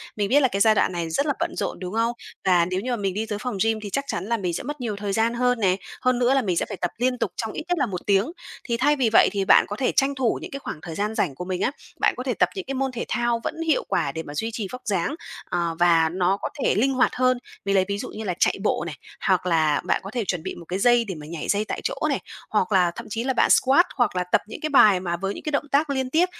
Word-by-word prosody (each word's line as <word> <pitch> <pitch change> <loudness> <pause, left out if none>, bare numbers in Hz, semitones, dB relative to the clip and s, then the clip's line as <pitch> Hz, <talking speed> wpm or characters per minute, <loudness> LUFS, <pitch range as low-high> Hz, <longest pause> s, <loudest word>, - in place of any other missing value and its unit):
Mình 205 -2 -1
biết 280 - +5
là 265 - +5
cái 200 -5 -3
giai 220 0 +5
đoạn - - +2
này 170 -2 -3
rất 280 - 0
là 290 - +1
bận - - -2
rộn, 200 - -3
đúng 180 +1 -6
không? 230 +1 +1 0.3
Và 180 -3 +4
nếu 185 +2 -2
như 250 +4 -3
mà 240 - 0
mình 195 -3 -1
đi 215 +3 -2
tới 210 -2 -4
phòng 245 -2 -4
gym 225 0 +1
thì 205 - -5
chắc 275 +7 -2
chắn 170 - -3
là 230 +2 0
mình 180 -4 -2
sẽ - - -3
mất 295 +1 -6
nhiều 225 -4 -2
thời 200 0 -3
gian 225 +3 +2
hơn 250 0 +1
nè. 190 -4 +3 0.3
Hơn 255 -1 +2
nữa 250 +1 +3
là 270 - +3
mình 185 -7 -1
sẽ - - +1
phải 200 - -7
tập 175 0 -2
liên 250 +2 +1
tục - - -1
trong 220 -1 -3
ít - - -5
nhất 355 0 0
là 275 - +3
1 185 -6 -5
tiếng. 200 +7 +2 0.3
Thì 235 -2 -1
thay 290 +5 +3
vì 255 -5 +2
vậy - - +7
thì 200 -2 -1
bạn - - +6
có 205 - -4
thể 255 +3 0
tranh 275 +1 +2
thủ 255 -4 0
những - - -8
cái 275 - -5
khoảng 165 - -6
thời 165 -1 -7
gian 210 +4 -2
rảnh 175 - 0
của 180 - -6
mình 185 0 -3
á, - - +1 0.3
bạn - - +3
có - - -4
thể - - -1
tập - - +2
những 385 - -5
cái 270 - -3
môn 270 0 -1
thể 240 -2 -4
thao 240 -1 0
vẫn - - -3
hiệu 310 - +2
quả 140 - 0
để 160 +3 -5
mà 145 - -9
duy 220 +10 -2
trì 215 -3 -3
vóc 250 - -7
dáng, 195 - 0 0.3
à, 175 -1 0
và 165 -2 +4
nó 185 +2 +1
có - - -2
thể - - +2
linh 265 +7 +2
hoạt 260 - +2
hơn. 255 0 +3 0.3
Mình 200 0 +1
lấy 190 -1 +4
ví 200 0 -2
dụ - - -5
như 220 - -7
là 190 -4 -1
chạy - - +3
bộ - - +1
này, 155 - -6 0.3
hoặc 185 -2 +2
là 160 -4 +2
bạn - - +1
có 195 - -7
thể 235 -2 -2
chuẩn 180 -4 -2
bị 190 - -5
một 170 - -11
cái 185 +2 -3
dây 240 +2 +4
để 190 -4 -5
mà 150 -1 -9
nhảy 165 -2 -5
dây 205 +1 +1
tại - - -4
chỗ - - -1
này, - - 0 0.3
hoặc - - 0
là 180 -3 +4
thậm - - -8
chí 225 +3 -2
là 265 +1 0
bạn - - +3
squat, 275 +7 +5
hoặc 245 -7 +1
là 180 - +1
tập 180 - +2
những 215 - -8
cái 310 - -1
bài 215 -9 +6
mà 175 -1 -2
với 195 +2 -2
những - - -9
cái 305 - -3
động 290 0 -1
tác 295 +2 +2
liên 265 -2 -1
tiếp 325 +6 +3
215 Hz, 320 wpm, -24 LUFS, 185-250 Hz, 0.3 s, vậy